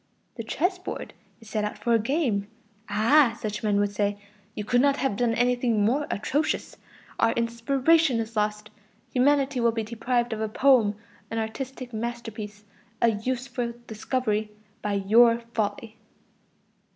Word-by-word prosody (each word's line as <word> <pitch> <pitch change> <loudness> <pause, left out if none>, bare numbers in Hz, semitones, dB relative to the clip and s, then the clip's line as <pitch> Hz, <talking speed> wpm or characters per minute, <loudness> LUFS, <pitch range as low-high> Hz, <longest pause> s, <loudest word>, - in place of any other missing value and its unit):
The 230 - -6
chess 360 - -1
board 365 - -6 0.3
is 225 -2 -14
set 215 -1 0
out 210 0 -3
for 235 +3 0
a 230 - +5
game. 230 -5 0 0.4
Ah! 230 +4 +4
such 210 -1 -4
men 205 -2 +1
would 205 0 +1
say, 205 0 0 0.4
"You 210 - -3
could 245 +4 +2
not 280 0 +3
have 265 -7 0
done 230 +1 +1
anything 245 -3 +2
more 280 +7 +1
atrocious! 285 +9 -1 0.4
Our 230 0 +3
inspiration 255 +5 +2
is 225 0 -4
lost; 210 0 -1 0.4
humanity 275 0 +3
will 235 -1 +3
be 225 -1 -2
deprived 235 +2 -1
of 220 - -4
a 220 - -1
poem, 235 -3 +4 0.3
an 225 - -4
artistic 250 +3 -5
masterpiece, 220 -2 -5 0.4
a 235 - +4
useful 245 +2 -3
discovery, 220 -1 -1 0.3
by 205 - -2
your 230 +4 +5
folly." 215 +1 -3
230 Hz, 150 wpm, -26 LUFS, 215-255 Hz, 0.4 s, a